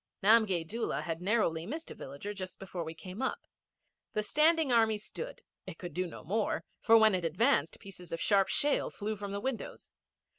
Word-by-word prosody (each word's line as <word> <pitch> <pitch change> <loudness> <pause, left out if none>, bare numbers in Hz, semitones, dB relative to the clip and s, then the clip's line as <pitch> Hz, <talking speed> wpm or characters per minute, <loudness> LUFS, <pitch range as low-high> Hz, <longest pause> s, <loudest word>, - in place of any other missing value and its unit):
Namgay 200 -6 +4
Doola 230 +4 -2
had 165 0 -3
narrowly 180 -5 +1
missed 320 +7 -5
a - - -5
villager 140 +10 -7
just 185 -2 -7
before 190 -3 -5
we 160 0 -7
came 185 +7 -8
up. 265 - -2 0.7
The 215 - 0
Standing 310 +4 +3
Army 225 -2 +4
stood. 480 - -8 0.2
It 175 -3 -7
could 175 -1 -7
do 185 0 -1
no 170 - -10
more, 210 +6 -1 0.2
for 225 0 +6
when 220 -2 +6
it 180 -2 0
advanced 170 - +2
pieces 185 -3 -10
of 165 - -3
sharp 195 -2 +3
shale 295 0 +1
flew 215 +1 -4
from 200 -1 -6
the 200 - -2
windows. 255 +1 -5
205 Hz, 190 wpm, -32 LUFS, 180-230 Hz, 0.7 s, for